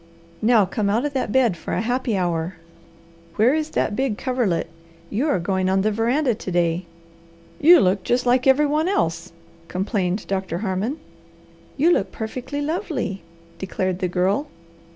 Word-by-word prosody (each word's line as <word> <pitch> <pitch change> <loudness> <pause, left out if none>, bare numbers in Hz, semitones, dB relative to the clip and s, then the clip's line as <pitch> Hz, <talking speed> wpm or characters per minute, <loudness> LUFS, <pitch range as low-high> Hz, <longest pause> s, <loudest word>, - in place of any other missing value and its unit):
Now 220 -2 +4
come 200 +2 -1
out 230 +7 +1
of 290 - -2
that 260 -5 -1
bed 240 -7 +3
for - - -6
a - - 0
happy 245 -2 -1
hour. 175 -1 -1 0.8
Where 230 +5 +4
is 310 0 -1
that 205 - 0
big 260 -4 -1
coverlet? 245 -12 0 0.4
You 250 +9 0
are 285 - +2
going 185 +1 0
on 190 0 +2
the 215 - +2
veranda 240 +5 +1
to 205 -3 -6
day." 170 0 +1 0.7
"You 340 +4 +8
look 190 +1 +2
just 245 +4 0
like 250 +2 +3
every 270 +3 +5
one 305 +3 +1
else," 165 - -1 0.4
complained 190 0 -1
Doctor 190 -3 -2
Harmon. 200 +9 -1 0.8
"You 320 +5 +4
look 195 - +1
perfectly 255 +6 -5
lovely," 295 - -3 0.4
declared 185 -1 -2
the 185 - 0
Girl. 190 - 0
215 Hz, 160 wpm, -22 LUFS, 185-265 Hz, 0.8 s, You